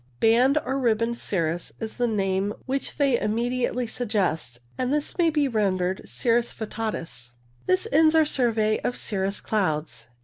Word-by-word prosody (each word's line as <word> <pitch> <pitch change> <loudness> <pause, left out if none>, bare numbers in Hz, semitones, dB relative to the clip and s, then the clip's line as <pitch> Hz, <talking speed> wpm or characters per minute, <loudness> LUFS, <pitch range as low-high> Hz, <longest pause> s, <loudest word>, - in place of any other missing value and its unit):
Banded 255 +6 +4
or 270 +1 -1
ribboned 230 -1 +1
cirrus 170 -3 -1
is 220 -1 -4
the 245 -1 +1
name 195 -1 0
which 270 +1 -3
they 280 -2 +3
BAND 240 - +2
CIRRUS 210 - -1
43 - - +1 0.2
immediately 250 0 -1
suggest, 190 - -1 0.2
and 255 0 -1
this 295 0 -1
may 335 -1 +5
be 300 -2 +1
rendered 190 -5 0
cirrus 235 0 +1
vittatus. 165 - -5 0.3
This 370 +4 +2
ends 315 0 +5
our 320 -1 +5
survey 225 -6 +1
of 245 - -2
cirrus 195 -1 -2
clouds. 155 - -2
225 Hz, 165 wpm, -25 LUFS, 190-255 Hz, 0.3 s, may